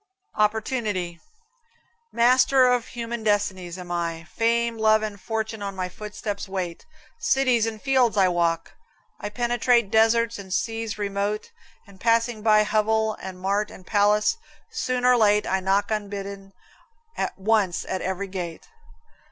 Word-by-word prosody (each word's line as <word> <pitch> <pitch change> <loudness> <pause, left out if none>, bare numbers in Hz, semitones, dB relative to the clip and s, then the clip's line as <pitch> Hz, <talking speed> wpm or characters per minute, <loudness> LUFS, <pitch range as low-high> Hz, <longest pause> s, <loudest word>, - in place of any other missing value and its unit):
OPPORTUNITY. 210 -5 -1 0.9
Master 255 +2 +4
of 250 -1 +2
human 235 -1 -5
destinies 190 -4 -1
am 180 -1 -8
I. 170 -1 -2
Fame, 230 +4 0
Love 215 0 +4
and 205 -2 -5
Fortune 220 -1 -3
on 200 -1 -4
my 185 -1 -3
footsteps 210 0 -6
wait. 180 -3 -4 0.3
Cities 255 -4 +2
and 220 -1 -5
fields 255 -3 +2
I 190 -2 +5
walk; 170 -2 0 0.5
I 205 - -4
penetrate 240 -1 +1
Deserts 225 +1 +3
and 190 -1 -10
seas 225 +2 -2
remote, 205 - -2 0.3
and, 200 -2 -18
passing 230 -1 +2
by 215 -1 +5
Hovel, 220 +1 +1
and 185 -1 -7
mart, 200 +3 0
and 185 - -13
palace, 210 - +2 0.3
soon 255 - -1
or 250 0 +6
late 210 -2 +4
I 190 - 0
knock 195 +3 +1
unbidden 200 -2 -5 0.8
once 200 -3 +1
at 190 - -3
every 190 +1 -2
gate! 180 -4 -6
210 Hz, 135 wpm, -24 LUFS, 195-230 Hz, 0.9 s, or